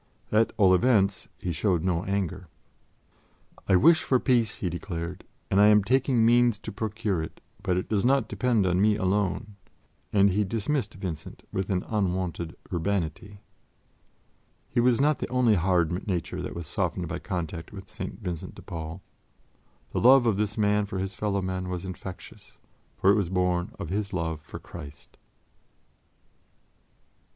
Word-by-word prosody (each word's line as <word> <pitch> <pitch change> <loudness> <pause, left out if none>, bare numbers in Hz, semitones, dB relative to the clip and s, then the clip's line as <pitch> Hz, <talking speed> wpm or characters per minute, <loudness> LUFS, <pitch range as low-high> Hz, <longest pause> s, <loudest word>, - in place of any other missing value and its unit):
At 110 +1 +3
all 95 -3 +6
events, 100 -2 +3
he 90 - -3
showed 85 0 +1
no 90 -2 0
anger. 95 -2 -2 1.2
"I 95 - +5
wish 160 - +6
for 130 - +2
peace," 120 -5 +2
he 95 - -3
declared, 85 0 -5 0.3
"and 100 - +5
I 105 - +7
am 105 -1 +6
taking 125 0 +2
means 120 -1 +4
to - - -7
procure 110 -5 -2
it, 80 - -7 0.2
but 90 - 0
it 90 - -2
does 105 -3 0
not 130 -2 +3
depend 120 -6 +1
on 90 0 +2
me 105 0 +4
alone"; 100 +1 -1 0.5
and 100 -1 +4
he 105 +3 +2
dismissed 110 +3 -2
Vincent 90 -6 -6
with 95 0 -2
an 90 -2 0
unwonted 90 -5 -2 0.2
urbanity. 100 +2 -2 1.3
His 120 - +2
was 125 0 +3
not 150 +2 +3
the - - -4
only 125 -3 +3
hard 90 -3 +2 0.2
nature 90 -4 -2
that - - -5
was 85 -1 -5
softened - - -2
by - - -4
contact 85 -2 -5
with 95 -1 -10
St. 95 - -7
Vincent 85 -4 -5
de - - -12
Paul. 80 +2 -7 0.9
The - - -1
love 130 +1 +7
of 115 -4 +3
this 105 +1 -1
man 105 -1 +2
for 100 - -5
his 95 +1 -3
fellow 100 -1 -1
men 95 0 -3
was 90 0 -4
infectious, 95 0 -9 0.4
for 95 - +4
it - - +4
was 100 -5 0
born 90 +1 0
of 100 -5 -6
his 100 +1 -2
love 80 -3 -2
for - - -9
Christ. 70 0 -11
100 Hz, 160 wpm, -27 LUFS, 90-110 Hz, 1.3 s, I